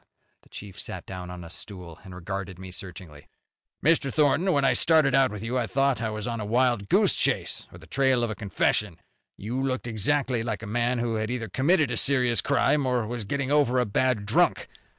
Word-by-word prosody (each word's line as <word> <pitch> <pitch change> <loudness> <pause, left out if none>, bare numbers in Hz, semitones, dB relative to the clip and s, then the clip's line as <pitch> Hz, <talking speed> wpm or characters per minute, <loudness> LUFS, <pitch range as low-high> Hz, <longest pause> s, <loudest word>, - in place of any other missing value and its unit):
The - - -25
chief 100 -2 -10
sat - - -6
down 90 -1 -7
on 90 -1 -8
a 85 - -10
stool 90 -4 -8
and 95 -1 -11
regarded 95 +1 -6
me 95 0 -9
searchingly. 90 -5 -9 0.6
"Mr. 160 -4 +3
Thornton, 155 +6 +2
when 140 -4 +2
I - - +4
started 155 -5 +4
out 135 0 +4
with 105 -1 -7
you, 125 +3 -1
I 115 - -1
thought 135 +2 +1
I 110 - -1
was 110 +1 -5
on 115 -1 -3
a - - -3
wild 120 -2 +1
goose - - +4
chase - - -1
or - - -12
the 85 - -15
trail 130 +4 +1
of 115 - -1
a - - -4
confession. 100 -1 0 0.4
You 120 +6 -3
looked 130 -2 -2
exactly 125 +2 0
like 115 -1 -4
a - - -5
man 120 +3 0
who 115 -1 -1
had 110 0 -2
either 120 -3 -4
committed 150 0 +2
a 120 - -2
serious 125 -3 +2
crime, 140 0 +2
or 125 -3 0
was 115 -1 -5
getting 140 +5 -2
over 145 -4 +3
a 125 - +2
bad 110 0 0
drunk. - - +2
120 Hz, 215 wpm, -26 LUFS, 100-130 Hz, 0.6 s, I